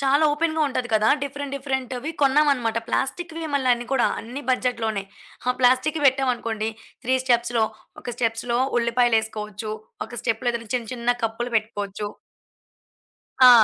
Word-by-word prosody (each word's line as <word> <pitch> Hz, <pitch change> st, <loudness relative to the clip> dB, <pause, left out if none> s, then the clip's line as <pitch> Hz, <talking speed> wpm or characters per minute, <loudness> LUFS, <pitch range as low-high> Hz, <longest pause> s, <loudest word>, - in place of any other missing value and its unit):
చాలా 280 Hz, +3 st, +4 dB
ఓపెన్‌గా 315 Hz, +1 st, 0 dB
ఉంటది 255 Hz, -2 st, -2 dB
కదా, 215 Hz, 0 st, +4 dB
డిఫరెంట్, 280 Hz, 0 st, -4 dB
డిఫరెంట్‌వి 265 Hz, +1 st, -3 dB
కొన్నామన్నమాట. 270 Hz, -5 st, +3 dB
ప్లాస్టిక్‌వే 325 Hz, +6 st, -2 dB
మళ్లన్ని 245 Hz, -3 st, +2 dB
కూడా, 265 Hz, -, +4 dB
అన్ని 250 Hz, +5 st, -7 dB
బడ్జెట్ 250 Hz, -2 st, 0 dB
లోనే. 205 Hz, -3 st, -1 dB, 0.4 s
ఆ -, -, +6 dB
ప్లాస్టిక్‌వి 260 Hz, +5 st, +3 dB
పెట్టాం 265 Hz, -1 st, +3 dB
అనుకోండి, 220 Hz, -2 st, -3 dB, 0.4 s
3 260 Hz, +2 st, +3 dB
స్టెప్స్‌లో 235 Hz, -2 st, +2 dB, 0.4 s
ఒక 245 Hz, -, -5 dB
స్టెప్స్‌లో 235 Hz, 0 st, 0 dB, 0.2 s
ఉల్లిపాయలేసుకోవచ్చు, 220 Hz, -3 st, 0 dB, 0.3 s
ఒక 240 Hz, -2 st, -7 dB
స్టెప్‌లో 240 Hz, +1 st, 0 dB
ఏదైనా 230 Hz, -2 st, -5 dB
చిన్న, 235 Hz, -3 st, -1 dB
చిన్న 240 Hz, 0 st, 0 dB
కప్పులు 240 Hz, +2 st, -2 dB
పెట్టుకోవచ్చు. 205 Hz, -1 st, -3 dB, 1.4 s
ఆ! -, -, +11 dB
245 Hz, 130 wpm, -24 LUFS, 225-270 Hz, 1.4 s, ఆ